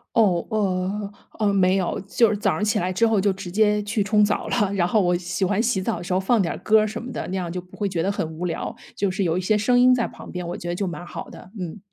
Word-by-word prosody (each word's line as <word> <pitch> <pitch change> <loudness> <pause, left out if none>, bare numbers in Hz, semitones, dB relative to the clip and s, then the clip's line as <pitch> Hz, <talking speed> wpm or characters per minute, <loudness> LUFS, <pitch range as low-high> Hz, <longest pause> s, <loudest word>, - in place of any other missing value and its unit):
哦， 190 -7 +3
呃， 200 -1 -1 0.3
呃， 205 -2 +2
没 185 -1 +3
有。 190 -3 -1
就 230 +2 +3
是 210 - 0
早 200 -3 +1
上 - - -2
起 210 -1 +1
来 180 +1 -1
之 185 +5 +2
后 215 -3 +2
就 200 -1 +3
直 185 -2 -7
接 210 +1 +3
去 205 0 0
冲 210 0 +4
澡 205 - -1
了， 205 -4 +1
然 175 -3 +1
后 215 - +2
我 175 -1 +2
喜 180 +2 -2
欢 205 +3 +1
洗 225 -5 +1
澡 180 - -1
的 175 - -7
时 185 - -6
候 185 - +3
放 215 +4 +2
点 170 - -2
歌 220 0 +5
儿 215 - +1
什 210 - -5
么 250 +1 -7
的， - - -4
那 190 - -3
样 175 -2 -3
就 180 +1 -4
不 180 - -17
会 205 - 0
觉 180 -4 -2
得 195 +4 +1
很 165 - -2
无 180 - -3
聊， 165 -2 -3 0.2
就 195 -2 0
是 195 +1 -1
有 170 -1 +1
一 - - 0
些 210 +3 +2
声 245 +4 +3
音 255 +1 +6
在 240 -2 +1
旁 - - -11
边， 180 -1 -5
我 175 - -4
觉 175 - -7
得 175 - -1
就 195 +1 -2
蛮 175 0 -6
好 - - -7
的。 185 - -13
嗯。 180 +3 -5
195 Hz, 325 characters per minute, -23 LUFS, 180-210 Hz, 0.3 s, 音